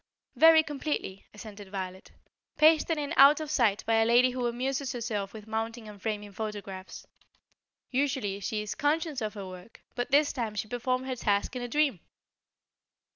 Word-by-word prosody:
"Very 320 0 +7
completely," 290 -10 -4
assented 205 -2 -11
Violet. 190 -1 -6 0.5
"Pasted 315 +1 +4
in 290 -1 -3
out 280 +3 +8
of 310 -1 -5
sight 225 -8 +2
by 225 0 +2
a 225 - +4
lady 245 +2 +5
who 250 -1 -2
amuses 260 +3 -2
herself 215 -5 -3
with 215 -2 -10
mounting 225 +1 -4
and 205 -2 -12
framing 210 -1 -4
photographs. 200 -2 -7 0.9
Usually, 260 -7 -1
she 210 +2 -3
is 210 - -4
conscious 300 -1 -1
of 215 0 -3
her 200 -2 -6
work, 185 +3 -12
but 245 +1 -3
this 285 +2 +3
time 230 -5 -3
she 210 - -3
performed 255 +2 -2
her 260 -1 -3
task 205 0 0
in 250 - -3
a 245 - -3
dream." 280 - +1
235 Hz, 170 wpm, -29 LUFS, 210-275 Hz, 0.9 s, out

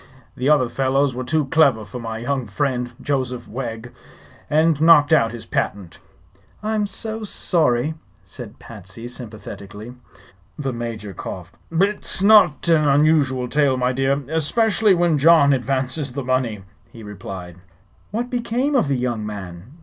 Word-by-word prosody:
The 130 +3 0
other 145 -5 +4
fellows 135 +2 +1
were 130 +1 -4
too 150 +3 0
clever 135 -7 +3
for 125 - -8
my 115 -1 -5
young 125 +1 -2
friend, 125 +2 -2
Joseph 130 -3 -3
Wegg, 115 -1 -6 0.6
and 155 0 +2
knocked 160 -2 +6
out 115 -8 +4
his 120 -1 -8
patent." 95 -4 -3 0.6
"I'm 215 -1 0
so 220 +3 -5
sorry!" 155 - +1 0.3
said - - -10
Patsy, 105 +1 -10
sympathetically. 110 -2 -9 0.6
The 135 -3 -3
Major 115 -4 -6
coughed. 90 0 -8 0.2
"It's 195 +2 +1
not 205 -7 +5
an 155 -3 +4
unusual 140 -3 +3
tale, 140 -1 +2
my 125 0 +1
dear; 135 +2 0
especially 205 +6 +2
when 170 -3 +2
John 145 -2 +6
advances 135 +1 -2
the 140 0 -4
money," 125 -5 -1 0.3
he 115 - -12
replied. 95 -4 -8 0.5
"What 240 +4 -3
became 245 +4 -1
of 250 - +3
the 140 -1 0
young 120 -3 -2
man?" 95 -3 -7
135 Hz, 140 wpm, -21 LUFS, 115-160 Hz, 0.6 s, knocked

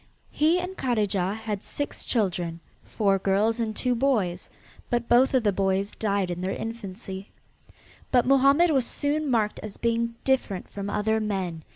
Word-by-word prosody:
He 320 +4 +3
and 360 +1 -5
Kadijah 205 - 0
had 215 -3 -4
six 290 - -5
children, 175 -7 0 0.2
four 195 -3 +1
girls 205 +5 +1
and 220 -2 -2
two 250 -1 0
boys, 230 -9 0 0.4
but 240 -1 0
both 255 +3 +4
of 255 - +3
the 205 - +3
boys 195 +1 0
died 200 -4 -1
in 175 0 -4
their 185 - -1
infancy. 195 -3 -7 0.8
But 245 -2 +3
Mohammed 275 +5 +5
was 270 -4 +3
soon 295 +1 -1
marked 220 -4 +1
as 215 -2 -8
being 230 0 0
different 250 -8 0
from 200 0 -5
other 220 +2 +1
men. 190 -6 -2
220 Hz, 160 wpm, -26 LUFS, 195-250 Hz, 0.8 s, Mohammed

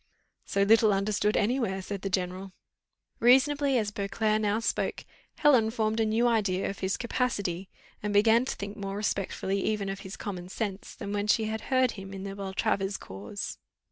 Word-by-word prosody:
"So 200 - +2
little 220 +1 +5
understood 205 +1 +1
any 245 +6 +2
where," 195 -6 -1
said 195 +1 -5
the 195 - -2
general. 185 +1 -2 0.7
Reasonably 270 +3 +4
as 210 -3 0
Beauclerc 215 +2 0
now 210 +1 +1
spoke, 230 - -1 0.3
Helen 255 -7 +4
formed 220 -1 0
a 225 - +3
new 225 +3 +2
idea 200 -5 +1
of 200 - -10
his 190 0 -1
capacity, 200 -7 -2 0.3
and 210 - -2
began 220 +4 +5
to - - -3
think 200 +1 -6
more 195 0 -4
respectfully 195 -1 -1
even 210 -2 -1
of 195 0 -4
his 195 -1 -8
common 185 -3 -6
sense, 200 -1 -4
than 200 - -5
when 205 0 -1
she 220 +1 +3
had 220 0 -2
heard 255 -2 +3
him 195 -1 -8
in 190 - -6
the 195 0 -5
Beltravers 195 0 -1
cause. 100 - -7
205 Hz, 180 wpm, -28 LUFS, 195-225 Hz, 0.7 s, little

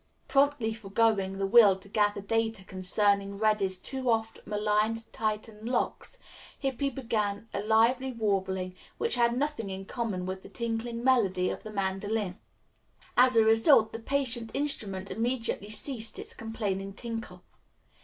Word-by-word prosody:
Promptly 275 -5 +2
foregoing 200 -2 +1
the 195 - 0
will 200 -2 +7
to 190 - -11
gather 205 0 +1
data 225 0 -1
concerning 200 +2 0
Reddy's 210 -3 +1
too 260 +6 -4
oft 225 -1 0
maligned 210 +2 0
Titian 215 0 -3
locks, 255 - -2 0.4
Hippy 275 +1 -1
began 225 -5 -2
a 200 - -1
lively 230 +5 +3
warbling 190 -5 -1 0.2
which 460 - +1
had 235 0 +3
nothing 280 -7 -2
in 190 0 -6
common 205 -6 -3
with 185 0 -4
the - - -12
tinkling 235 0 -3
melody 195 -8 +3
of - - -6
the 215 - -8
mandolin. 195 0 -2 0.8
As 255 0 +6
a 225 -1 +6
result 225 0 +5
the 225 - -4
patient 240 -2 -1
instrument 200 -10 -2
immediately 230 -3 -1
ceased 225 +1 -2
its - - -4
complaining 200 -4 -3
tinkle. 225 +1 -6
220 Hz, 140 wpm, -29 LUFS, 200-235 Hz, 0.8 s, will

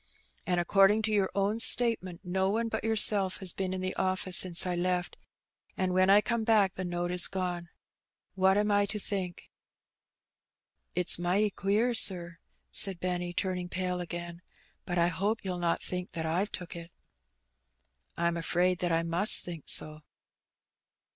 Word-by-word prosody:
And, 180 -1 0
according 195 +4 +3
to 220 - -1
your 200 -3 +1
own 200 +3 -1
statement, 230 -8 +4
no 190 +1 -1
one 225 +3 -2
but 220 - -4
yourself 210 -3 +4
has 190 -3 -1
been 190 -1 -4
in 185 0 -4
the 185 0 -3
office 185 -1 0
since 180 -2 +5
I 180 -1 -2
left, 180 0 -2 0.6
and 185 -1 -1
when 185 +1 +2
I 205 +1 +6
come 235 0 -2
back 210 -4 +2
the 185 - -6
note 175 0 -4
is 180 -1 +3
gone. 180 -2 -5 0.6
What 190 +1 +2
am 210 0 0
I 205 0 +2
to 210 - -4
think?'' 190 -4 -5 1.5
''It's 180 -1 +1
mighty 195 +4 0
queer, 210 +6 -1
sir," 175 -6 +2 0.3
said 195 -3 +5
Benny, 180 -1 -3
turning 180 0 -4
pale 180 0 -3
again; 175 0 -8 0.5
"but 175 - -2
I 170 0 +2
hope 205 +4 -3
you'll 180 -2 -4
not 170 -1 -1
think 180 0 -6
that 160 - -3
I've 180 +6 -1
took 180 -1 -7
it." 170 0 -9 0.7
" 65 +1 -45
I'm 170 0 -1
afraid 180 +2 0
that 175 - -1
I 165 0 0
must 170 +5 +2
think 170 -4 -8
so." 155 0 -2
185 Hz, 165 wpm, -28 LUFS, 175-200 Hz, 1.5 s, I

